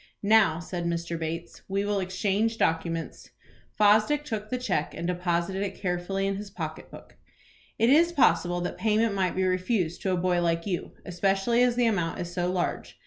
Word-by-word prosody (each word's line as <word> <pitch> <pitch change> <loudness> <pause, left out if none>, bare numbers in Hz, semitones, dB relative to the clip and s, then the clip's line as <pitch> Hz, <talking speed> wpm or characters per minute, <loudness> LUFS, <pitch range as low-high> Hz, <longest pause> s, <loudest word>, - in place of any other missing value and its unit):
"Now," 200 -6 +4
said 175 0 -5
Mr. 170 0 -2
Bates, 165 +1 -5
"we 195 +1 -1
will 205 -1 0
exchange 200 +4 0
documents." 165 -1 -2 0.4
Fosdick 215 +8 +3
took 215 -5 -4
the 255 - -1
cheque, 190 -11 -2
and 170 - -5
deposited 180 +1 -1
it 195 -1 -3
carefully 185 +1 -2
in 195 0 -1
his 205 0 -7
pocket - - -6
book. - - -14 0.6
"It 230 +3 +3
is 335 +4 +5
possible 175 - +2
that 175 - -4
payment 220 0 +2
might 190 -2 0
be 190 - +1
refused 185 -1 0
to 190 - 0
a 185 - +1
boy 175 0 +1
like 170 -1 0
you, 185 -4 -3
especially 195 +6 +1
as 245 -1 +3
the 245 -1 +2
amount 175 -7 0
is 175 0 -5
so 180 0 -1
large. 180 -1 -3
190 Hz, 185 wpm, -27 LUFS, 175-210 Hz, 0.6 s, is